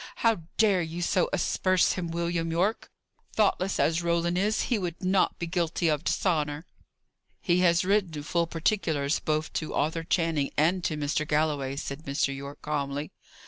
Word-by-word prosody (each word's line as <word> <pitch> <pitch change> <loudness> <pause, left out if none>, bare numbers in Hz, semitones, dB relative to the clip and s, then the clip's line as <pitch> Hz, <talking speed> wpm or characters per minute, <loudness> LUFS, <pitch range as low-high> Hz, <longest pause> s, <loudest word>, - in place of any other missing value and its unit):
"How 225 -6 +3 0.2
dare 205 -5 +4
you 170 +1 -4
so 180 +1 +2
asperse 185 0 +2
him, 180 -2 -3
William 170 0 -1
Yorke? 185 +7 0 0.5
Thoughtless 195 -3 +1
as 165 +1 +2
Roland 170 0 +1
is, 210 +4 +1
he 240 -4 0
would 175 -1 -5
not 185 +1 +2
be 170 - -3
guilty 170 -1 0
of 150 0 0
dishonour." 150 -3 0 0.7
"He 175 0 +2
has 175 +1 +3
written 185 -7 +1
full 170 +2 0
particulars 160 -4 0
both 155 0 -2
to 155 - -3
Arthur 160 +3 0
Channing 165 -4 0
and 170 +4 +2
to 155 - -1
Mr. 150 +1 -1
Galloway," 150 -3 0
said 140 +2 -6
Mr. 140 0 0
Yorke, 140 +1 -9
calmly. 145 0 -3
165 Hz, 160 wpm, -27 LUFS, 150-180 Hz, 0.7 s, dare